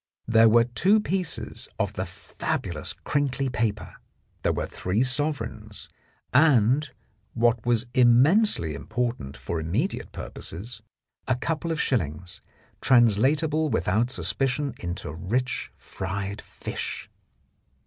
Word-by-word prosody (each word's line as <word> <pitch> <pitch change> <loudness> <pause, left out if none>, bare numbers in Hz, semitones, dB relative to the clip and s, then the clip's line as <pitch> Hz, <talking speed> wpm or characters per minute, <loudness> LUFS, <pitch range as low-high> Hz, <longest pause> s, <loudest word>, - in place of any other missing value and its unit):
There 115 0 +6
were 115 +1 +6
two 180 - +3
pieces 185 -5 -2
of - - -1
the - - -3
fabulous - - -4
crinkly 140 -2 0
paper, 110 -3 -2 0.4
there - - +2
were - - -2
three 100 +7 -1
sovereigns, 120 -6 -3 0.4
and, 135 0 +4 0.5
what 120 -1 +2
was 120 0 +2
immensely 125 - +4
important 110 - -3
for 85 - -3
immediate 100 - -2
purposes, 105 +6 -8 0.5
a 130 - +2
couple 165 +5 -2
of 160 - -2
shillings, 90 - -2 0.4
translatable 140 +7 +4
without 110 0 +1
suspicion 135 +2 -1
into 85 -4 -5
rich 115 +10 -2
fried 100 +2 -5
fish. - - -5
120 Hz, 105 wpm, -26 LUFS, 105-140 Hz, 0.5 s, There